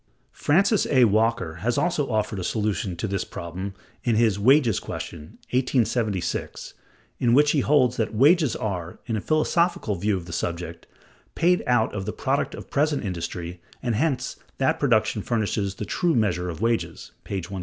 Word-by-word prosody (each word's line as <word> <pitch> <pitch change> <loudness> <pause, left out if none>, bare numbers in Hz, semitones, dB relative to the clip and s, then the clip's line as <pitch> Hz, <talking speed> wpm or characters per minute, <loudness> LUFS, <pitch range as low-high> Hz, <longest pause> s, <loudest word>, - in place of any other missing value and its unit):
Francis 195 +7 +2
A. 130 -3 +4
Walker(168) 110 -6 +2
has 120 +6 0
also 160 -5 0
offered 105 -3 -1
a - - -3
solution 105 -2 -1
of 85 +6 -3
this 100 -2 -1
problem 95 +3 -6 0.3
in 120 -3 +2
his 110 -3 +2
"Wages 125 -1 +4
Question" 80 -2 -7
(1876), 120 -6 -1 0.5
in 120 -1 +3
which 150 +1 +5
he 150 - +2
holds 130 -3 +3
that 110 - 0
"wages 145 +4 +4
are, 90 -5 -4
in 115 - -2
a 105 - -2
philosophical 155 - +1
view 100 +2 0
of 90 - -7
the 85 - -8
subject, 85 -1 -4 0.5
paid 180 +2 +3
out 120 -3 +2
of 100 -1 -4
the 105 - -2
product 140 +1 -1
of - - -11
present 145 -3 +1
industry, 85 -1 -5 0.2
and 120 -2 0
hence 130 +1 -1 0.2
that 160 +5 +1
production 110 -5 +2
furnishes 105 -3 -1
the 105 - -5
true 170 - 0
measure 90 -6 +1
of 85 +3 -6
wages" 100 -8 -1
(p. - - -5
128). 95 +1 -4
110 Hz, 170 wpm, -24 LUFS, 95-135 Hz, 0.5 s, which